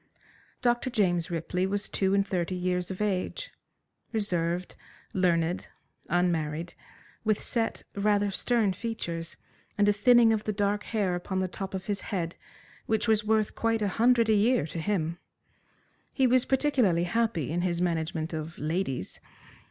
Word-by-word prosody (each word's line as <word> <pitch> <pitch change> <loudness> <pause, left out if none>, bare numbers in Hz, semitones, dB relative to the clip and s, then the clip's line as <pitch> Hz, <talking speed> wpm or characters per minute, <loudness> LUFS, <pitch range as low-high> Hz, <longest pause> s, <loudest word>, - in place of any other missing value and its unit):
Dr. 240 +1 +2
James 180 -7 +1
Ripley 180 +2 -1
was 205 +1 -2
two 195 0 +1
and 200 0 +3
thirty 185 -2 -1
years 180 0 -1
of 190 +2 -3
age, 210 - -2 0.6
reserved, 180 -5 -1 0.4
learned, 175 -1 +1 0.4
unmarried, 170 -1 0 0.5
with 215 -2 +2
set, 230 -2 -2
rather 205 0 +2
stern 220 -1 +1
features, 170 -7 -5 0.4
and 205 0 +4
a 205 - +5
thinning 230 +2 +5
of 215 -1 -2
the 215 - -1
dark 205 +1 0
hair 205 -5 0
upon 185 +2 -2
the 185 - 0
top 190 +1 -6
of 190 - -5
his 205 -2 -2
head, 175 -5 -3 0.5
which 220 +1 +1
was 220 -1 +3
worth 215 0 +1
quite 225 -1 0
a 205 - +1
hundred 235 -1 +5
a 220 - +4
year 215 - +3
to 165 +1 -6
him. 170 -2 -1 0.9
He 265 - +2
was 255 0 +4
particularly 255 - +2
happy 175 - 0
in 175 +2 0
his 175 -1 0
management 165 -2 -1
of 160 +1 -5
ladies. 150 - -2
195 Hz, 150 wpm, -28 LUFS, 175-220 Hz, 0.9 s, a